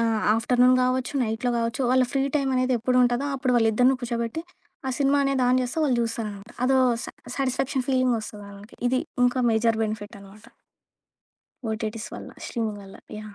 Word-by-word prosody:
ఆహ్, 225 -1 +1 0.2
ఆఫ్ట్‌ర్‌నున్ 250 +2 +4
గావచ్చు, 255 +1 0
నైట్‌లో 225 +3 -1
గావచ్చు 230 +3 -1
వాళ్ళ 255 -1 +4
ఫ్రీ 275 0 +2
టైమ్ 270 -2 0
అనేది 255 0 +2
ఎప్పుడు 250 +1 +2
ఉంటదో 245 +4 0
అప్పుడు 255 -1 0
వాళ్ళిద్దరిని 235 +4 +3
కూర్చోబెట్టి 235 +5 -3 0.5
ఆ - - 0
సినిమా 280 +1 +3
అనేది 275 -2 +1
ఆన్ 255 - +4
జేస్తే 250 +6 -3
వాళ్ళు 260 -4 +2
చూస్తారనమాట. 220 -2 -5
అదో 265 +1 +3 0.3
సా - - -6 0.3
సాటిస్ఫాక్షన్ 265 0 -1
ఫీలింగ్ 255 -2 +2
ఒస్తది 210 -1 -9
వాళ్ళకి. 200 +1 -13
ఇది 255 +1 +1 0.3
ఇంకా 245 +1 +2
మేజర్ 225 0 +2
బెనిఫిట్ 215 0 -5
అనమాట. 200 +2 -15 1.3
ఓటి‌టిస్ 220 +1 -4
వల్ల - - -8
స్ట్రీమింగ్ 220 -4 -3
వల్ల 195 0 -12 0.2
యాహ్! 215 -1 -10
240 Hz, 165 wpm, -25 LUFS, 220-255 Hz, 1.3 s, ఆఫ్ట్‌ర్‌నున్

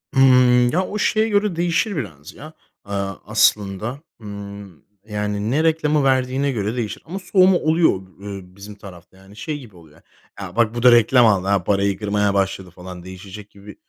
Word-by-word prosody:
Hımm, 125 -2 +5
ya, 185 +4 0
o 210 - -5
şeye 215 +1 +1
göre 205 -3 +1
değişir 175 +5 0
biraz, 80 - -7
ya, 155 +5 -12 0.3
ııı, 100 -1 -4
aslında. 105 +2 +1 0.2
Hımm, 100 -4 -10 0.2
yani, 105 0 -3
ne 150 +4 +1
reklamı 155 -2 +1
verdiğine 130 +1 +1
göre 110 -2 -3
değişir 110 -4 -4
ama 185 +4 -6
soğuma 185 -1 +3
oluyor, 160 +1 +2 0.3
ııı, 100 -2 -9
bizim 100 +1 -11
tarafta, 95 -3 -14
yani, 95 +2 -17
şey 145 +8 -5
gibi 115 -7 -14
oluyor, 80 -3 -19 0.4
"ya - - -8
bak 115 -1 +1
bu 120 - -3
da 125 - +8
reklam 120 +1 +5
aldı, 100 -4 +2
he, - - -13
parayı 100 0 0
kırmaya 105 -1 0
başladı." 95 -1 -1
falan 90 0 -10
değişecek 95 +3 -11
gibi 100 0 -14
105 Hz, 175 wpm, -20 LUFS, 100-140 Hz, 0.4 s, da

